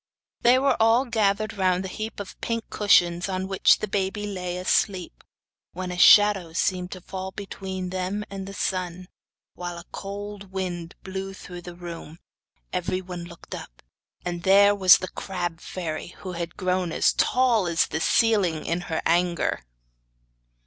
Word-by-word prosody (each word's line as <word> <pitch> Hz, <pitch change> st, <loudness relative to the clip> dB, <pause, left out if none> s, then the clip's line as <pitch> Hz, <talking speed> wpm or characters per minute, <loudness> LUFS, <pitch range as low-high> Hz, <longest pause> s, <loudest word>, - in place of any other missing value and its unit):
They 245 Hz, +2 st, +6 dB
were 275 Hz, +1 st, +3 dB
all 225 Hz, +4 st, +4 dB
gathered 215 Hz, -3 st, +1 dB
round 185 Hz, -2 st, +1 dB
the -, -, -4 dB
heap 215 Hz, +3 st, -6 dB
of 200 Hz, -2 st, -8 dB
pink 230 Hz, -1 st, -2 dB
cushions 175 Hz, -3 st, +3 dB
on 190 Hz, 0 st, -2 dB
which 195 Hz, -1 st, +4 dB
the 215 Hz, -, -3 dB
baby 195 Hz, +1 st, -2 dB
lay 180 Hz, -3 st, -4 dB
asleep, 185 Hz, 0 st, 0 dB, 0.5 s
when 185 Hz, 0 st, -4 dB
a 180 Hz, -, -5 dB
shadow 195 Hz, -4 st, +6 dB
seemed 180 Hz, +1 st, 0 dB
to 185 Hz, -, -9 dB
fall 190 Hz, +1 st, -6 dB
between 190 Hz, -2 st, -6 dB
them 185 Hz, +3 st, -2 dB
and 195 Hz, -1 st, -7 dB
the 195 Hz, -, -7 dB
sun, 185 Hz, -1 st, -3 dB, 0.4 s
while 175 Hz, -1 st, -6 dB
a 170 Hz, -, -8 dB
cold 200 Hz, 0 st, -7 dB
wind 175 Hz, -3 st, -4 dB
blew 195 Hz, 0 st, -5 dB
through 180 Hz, -1 st, -9 dB
the 175 Hz, 0 st, -9 dB
room. 170 Hz, -2 st, -8 dB, 0.6 s
Everybody 180 Hz, -1 st, -3 dB
looked 170 Hz, 0 st, -11 dB
up, -, -, -9 dB, 0.4 s
and 175 Hz, -1 st, -3 dB
there 200 Hz, +2 st, +6 dB
was 190 Hz, -2 st, +7 dB
the 185 Hz, -, -5 dB
crab 175 Hz, -3 st, -4 dB
fairy, 170 Hz, -1 st, -5 dB
who 185 Hz, -, -5 dB
had 170 Hz, -1 st, -5 dB
grown 185 Hz, -2 st, 0 dB
as -, -, +3 dB
tall 240 Hz, -7 st, +2 dB
as 170 Hz, -1 st, +2 dB
the 160 Hz, -, -3 dB
ceiling 195 Hz, -7 st, +2 dB
in 170 Hz, +2 st, -1 dB
her 160 Hz, -, -1 dB
anger. 175 Hz, -, +1 dB
185 Hz, 160 wpm, -25 LUFS, 175-200 Hz, 0.6 s, was